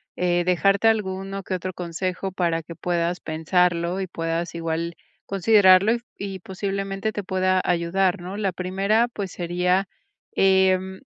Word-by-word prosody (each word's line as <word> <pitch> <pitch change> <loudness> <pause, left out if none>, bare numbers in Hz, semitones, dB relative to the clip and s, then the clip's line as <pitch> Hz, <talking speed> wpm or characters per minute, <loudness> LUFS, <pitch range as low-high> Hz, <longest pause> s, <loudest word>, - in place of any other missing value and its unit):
eh, 175 -1 +1
dejarte 195 +4 +3
alguno 195 -2 -1
que 185 - -3
otro 185 0 -4
consejo 185 +2 -3
para 170 -3 -1
que 170 - -9
puedas 175 +1 -1
pensarlo 170 +2 0
y 190 - -2
puedas 165 0 -3
igual 165 0 -3 0.3
considerarlo 200 +2 +5 0.2
y 195 -1 -5
posiblemente 195 +2 -3
te 205 - -4
pueda 185 0 +1
ayudar, 180 +1 +1
¿no? 190 +3 -6
La 195 -3 -1
primera, 195 +6 +1
pues 200 -5 -5
sería 180 +2 0 0.4
em, 190 0 +2
185 Hz, 135 wpm, -24 LUFS, 175-195 Hz, 0.4 s, considerarlo